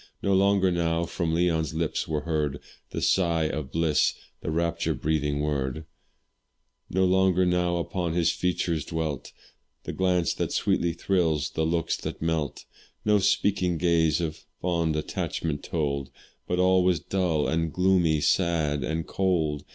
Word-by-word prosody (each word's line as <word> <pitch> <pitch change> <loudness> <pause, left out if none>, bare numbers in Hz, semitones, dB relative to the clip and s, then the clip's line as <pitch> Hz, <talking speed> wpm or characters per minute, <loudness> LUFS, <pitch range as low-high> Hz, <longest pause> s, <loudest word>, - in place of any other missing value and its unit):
No 100 - +2
longer 95 -1 +3
now 85 -1 0
from 85 0 -2
Leon's 80 -3 +1
lips 80 -1 -1
were 75 -1 -1
heard 75 -3 -1 0.3
The - - -4
sigh 85 -3 +2
of 75 -3 -3
bliss 80 -1 +2 0.3
the - - -4
rapture 85 +1 0
breathing 75 -1 -1
word; 75 0 -2 1.0
No 95 +1 +2
longer 95 0 +3
now 90 -1 +1
upon 85 0 -2
his 85 -1 +2
features 85 -3 -1
dwelt 80 -4 -4 0.5
The - - -5
glance 90 -2 +1
that - - -2
sweetly 85 -1 +1
thrills 80 -9 0
the 80 0 0
looks 85 0 0
that - - -6
melt; 80 -3 -2 0.4
No 105 -1 +4
speaking 95 -2 +1
gaze 80 -2 +2
of 80 -2 -4 0.2
fond 85 -3 0
attachment 75 0 -3
told, 70 -4 -2 0.4
But 90 - 0
all 90 0 +4
was 90 -3 +2
dull 85 -3 0
and 80 0 0
gloomy, 90 -4 +2
sad 80 -4 +1
and 80 +1 -2
cold. 80 -6 0
85 Hz, 145 wpm, -26 LUFS, 75-90 Hz, 1.0 s, No